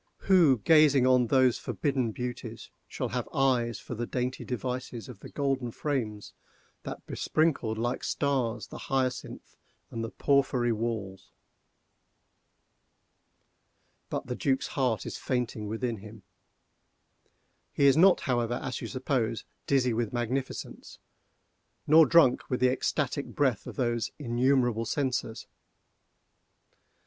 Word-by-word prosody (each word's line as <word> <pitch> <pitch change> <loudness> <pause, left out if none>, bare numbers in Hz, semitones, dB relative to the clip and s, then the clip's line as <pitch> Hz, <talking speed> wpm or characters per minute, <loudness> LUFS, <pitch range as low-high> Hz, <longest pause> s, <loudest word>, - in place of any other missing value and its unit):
—who, 170 -9 +5
gazing 150 -5 +5
on 125 -2 +4
those 130 -1 +3
forbidden 135 -5 -1
beauties, 120 -1 -6 0.2
shall - - -4
have - - -3
eyes 125 -4 +1
for - - -8
the 120 +1 -4
dainty 125 +1 -3
devices 125 -1 -4
of 125 -6 -11
the - - -11
golden 135 -3 -1
frames 115 -6 -3 0.5
that - - -8
besprinkled, 140 -9 0
like 120 +2 -2
stars, 125 -6 -1
the - - -9
hyacinth 130 -2 -2 0.4
and 115 - -4
the 115 - -3
porphyry 135 -4 +1
walls? 110 -4 -4 2.8
But - - -3
the 125 - -4
Duc's 135 +1 0
heart 125 -5 0
is - - -5
fainting 120 -4 -2
within 115 +2 -2
him. 105 0 -12 1.5
He 140 - +1
is 135 - +6
not, 185 +3 +5
however, 120 -5 0
as 125 0 -4
you - - -4
suppose, 130 -4 -2 0.2
dizzy 125 -3 +2
with 115 -1 -1
magnificence, 125 +2 -4 0.9
nor 160 +1 +7
drunk 165 -7 +4
with 125 - -1
the 125 0 +4
ecstatic 140 +1 -1
breath 130 -7 0
of - - -7
those 120 -4 -1
innumerable 120 -3 +1
censers. 130 -4 -2
125 Hz, 120 wpm, -28 LUFS, 115-135 Hz, 2.8 s, nor